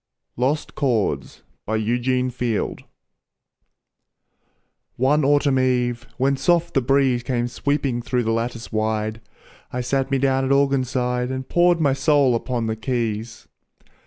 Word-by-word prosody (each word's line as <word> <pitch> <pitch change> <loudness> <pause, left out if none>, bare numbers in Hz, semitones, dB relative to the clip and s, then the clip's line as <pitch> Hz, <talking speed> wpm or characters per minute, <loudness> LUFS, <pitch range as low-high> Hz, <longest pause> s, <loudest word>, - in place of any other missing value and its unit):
LOST 135 +5 -1
CHORDS 110 - -1 0.2
BY 110 - 0
EUGENE 125 +3 0
FIELD 120 -3 -2 2.1
One 145 +4 +2
autumn 140 -1 +3
eve, 125 -1 0
when 135 +1 +1
soft 170 +3 +1
the 135 - +3
breeze 130 -1 +2
Came 120 -1 -1
sweeping 135 -1 -1
through 125 +1 -1
the 115 - 0
lattice 115 0 -3
wide, 110 0 -1 0.5
I 125 - -2
sat 135 +2 -1
me 135 - +1
down 135 0 +1
at 130 - 0
organ 140 -1 +3
side 125 -1 -1
And 130 0 -4
poured 175 0 +3
my 145 -4 +3
soul 140 -2 +3
upon 120 0 -2
the 110 0 -1
keys. 115 -1 -3
125 Hz, 135 wpm, -22 LUFS, 120-135 Hz, 2.1 s, autumn